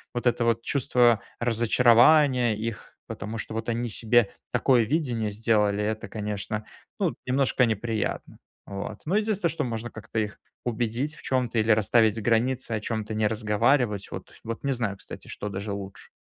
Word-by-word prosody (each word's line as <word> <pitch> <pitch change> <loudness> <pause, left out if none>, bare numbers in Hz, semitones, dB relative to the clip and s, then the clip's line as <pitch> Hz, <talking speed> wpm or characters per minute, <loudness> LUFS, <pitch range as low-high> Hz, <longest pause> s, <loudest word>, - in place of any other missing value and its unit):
вот 120 - -3
этого 120 0 +2
вот 115 0 0
чувство 120 -5 +3 0.2
разочарования 120 +2 +4
их, 110 0 -6
потому 110 +3 -5
что 110 - -5
вот 115 +1 -3
они 120 +1 -1
себе 115 0 +2 0.2
такое 125 -3 +3
видение 120 -5 -1
сделали,- 105 -1 +1
это 110 +1 -2
конечно 105 0 -4 0.3
ну - - +1
немножко 130 0 +2
неприятно, 110 0 -3 0.3
вот. 100 +2 -6
Но 170 +6 0
единственное, 210 -4 +1
что 155 - -2
можно 120 -2 -4
как-то 110 +1 -8
их 105 -1 -3 0.3
убедить 120 +5 -1
в - - -14
чём-то 125 -3 0
или 110 +1 +3
расставить 110 +1 +3
границы, 120 +2 +1
о 110 - 0
чём-то 110 0 -3
не 110 0 +1
разговаривать. 110 +1 +1
Вот, - - -8
вот 115 0 -5
не 140 - 0
знаю 115 -5 -2
кстати, - - -10
что 105 - -5
даже 100 +1 -4
лучше. 100 -1 -7
115 Hz, 165 wpm, -26 LUFS, 105-125 Hz, 0.3 s, разочарования